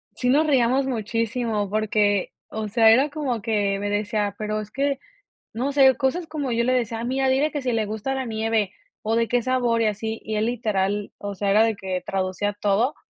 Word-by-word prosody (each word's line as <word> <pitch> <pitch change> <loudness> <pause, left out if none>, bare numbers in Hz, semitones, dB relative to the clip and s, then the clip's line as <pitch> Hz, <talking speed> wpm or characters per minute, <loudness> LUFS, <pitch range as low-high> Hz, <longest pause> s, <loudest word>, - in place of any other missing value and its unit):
Sí 250 - -1
nos 295 +5 +4
reíamos 265 -2 +3
muchísimo 230 -2 -1
porque, 210 -2 +1 0.2
o 220 0 -4
sea, 225 +1 +5
era 265 +6 +4
como 280 -6 -3
que 205 -3 0
me 205 0 -2
decía 205 0 -1
pero 215 0 -2
es 210 - -9
que, 275 +3 -1 0.5
no 250 +5 -1
sé, 270 -2 +5
cosas 290 +6 0
como 300 -5 -3
yo 235 0 +1
le 255 +2 +2
decía: 230 -2 -1
"Mira, 265 +2 0
dile 275 +4 +2
que 290 - -3
si 255 -1 -1
le 220 -1 +1
gusta 220 +6 -3
la 265 -1 -2
nieve 220 -3 0 0.3
o 220 +1 0
de 230 0 +2
qué 245 0 +1
sabor 245 -2 +1
y - - +2
así", 220 +1 -2
y 215 - -3
él 215 +1 +1
literal, 205 -4 -1
o 205 0 -5
sea, 200 +1 0
era 215 +2 +5
de 225 -1 +1
que 190 -2 -4
traducía 195 +2 -2
todo, 210 +7 +1
225 Hz, 210 wpm, -24 LUFS, 210-255 Hz, 0.5 s, sea